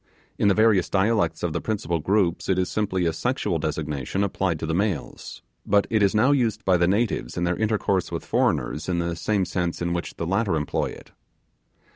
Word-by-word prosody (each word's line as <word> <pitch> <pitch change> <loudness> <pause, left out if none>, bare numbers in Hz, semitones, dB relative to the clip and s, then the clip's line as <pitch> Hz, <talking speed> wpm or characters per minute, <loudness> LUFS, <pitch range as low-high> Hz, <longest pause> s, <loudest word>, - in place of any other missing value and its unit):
In - - +3
the 100 - +4
various 110 -4 +3
dialects 95 -5 +1
of 85 -3 -1
the 85 - -2
principal 95 -6 -2
groups 95 +1 0
it 95 - +2
is 90 -1 0
simply 95 -4 0
a 80 - +1
sexual 95 - -1
designation 75 +3 -2
applied 95 -3 -1
to 80 - -4
the 80 - -2
males; 100 +3 -3 0.2
but 100 0 +3
it 110 -2 +2
is 100 +1 +3
now 125 +6 +4
used 120 -7 0
by 95 - +4
the 85 0 +3
natives 100 - 0
in 85 - 0
their 85 0 +1
intercourse 105 -3 0
with - - -4
foreigners 80 +4 0
in 90 - 0
the 85 0 -1
same 100 +2 0
sense 90 -1 -2
in 85 0 -1
which 85 -1 -4
the 85 - -4
latter 95 +1 +1
employ 75 -2 -1
it. - - -11
95 Hz, 205 wpm, -24 LUFS, 85-105 Hz, 0.2 s, the